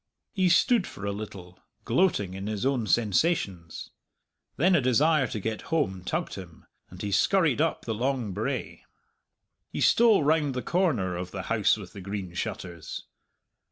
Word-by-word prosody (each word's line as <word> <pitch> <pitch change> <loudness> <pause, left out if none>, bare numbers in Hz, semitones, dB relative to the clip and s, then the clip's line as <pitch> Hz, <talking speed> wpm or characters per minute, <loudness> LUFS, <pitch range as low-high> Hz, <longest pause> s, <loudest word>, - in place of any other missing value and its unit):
He 185 -2 +2
stood 220 +4 +4
for 100 - -8
a 100 - -1
little, 95 -3 -8 0.3
gloating 135 - +1
in 95 +1 -5
his 105 +1 -2
own 130 -5 0
sensations. 105 - 0 0.7
Then 180 +6 +4
a 170 - +4
desire 135 +3 +3
to 110 - -4
get 110 +2 -3
home 115 - 0
tugged 90 - -2
him, 90 -4 -10 0.2
and 90 - -12
he 100 - -2
scurried 150 - +3
up 165 0 0
the 115 - -2
long 125 -1 -1
brae. - - -4 0.9
He - - -5
stole 225 -8 +5
round 150 -2 +2
the 125 - -3
corner 135 - +1
of 90 +1 -5
the 95 -1 -6
House 110 -1 +3
with 100 -4 -10
the 100 - -9
Green 95 -2 -5
Shutters. 85 -1 -5
110 Hz, 160 wpm, -27 LUFS, 95-155 Hz, 0.9 s, stole